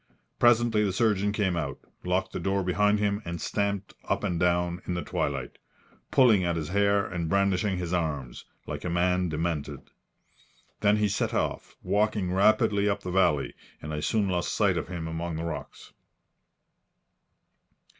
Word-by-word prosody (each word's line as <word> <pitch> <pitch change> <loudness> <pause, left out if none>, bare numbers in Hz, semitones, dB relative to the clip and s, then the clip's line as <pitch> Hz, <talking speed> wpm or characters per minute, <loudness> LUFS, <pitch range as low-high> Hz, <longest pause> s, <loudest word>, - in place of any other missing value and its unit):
Presently 120 -2 +4
the 100 - +1
surgeon 105 -1 +1
came 100 -4 0
out, 75 -5 -3 0.3
locked 95 +2 -1
the - - -3
door 95 +2 0
behind 105 +3 +2
him 105 0 0
and 85 -2 -5
stamped 100 +1 -2
up - - -1
and 85 -2 -1
down 90 0 +1
in 90 - -1
the 85 - -3
twilight, - - -3 0.5
pulling 115 -8 +5
at 85 -1 0
his 80 -2 -3
hair 100 +1 +2
and 85 -2 -3
brandishing 100 0 +1
his 90 -1 -3
arms, 75 -7 -2 0.2
like - - -6
a 90 - -2
man 90 +1 +1
demented. 75 -3 -3 0.9
Then 105 0 +3
he 105 0 +2
set 100 - -1
off, - - -2
walking 105 -3 0
rapidly 105 +1 +3
up 100 0 -1
the 90 - -4
valley, 80 -7 +2 0.3
and 75 +1 -6
I 75 - -2
soon 105 +6 +1
lost 90 -2 -1
sight 100 -4 +3
of - - -3
him 85 -3 -5
among 80 +1 -4
the 80 - -4
rocks. 85 -2 -7
95 Hz, 165 wpm, -27 LUFS, 85-100 Hz, 0.9 s, pulling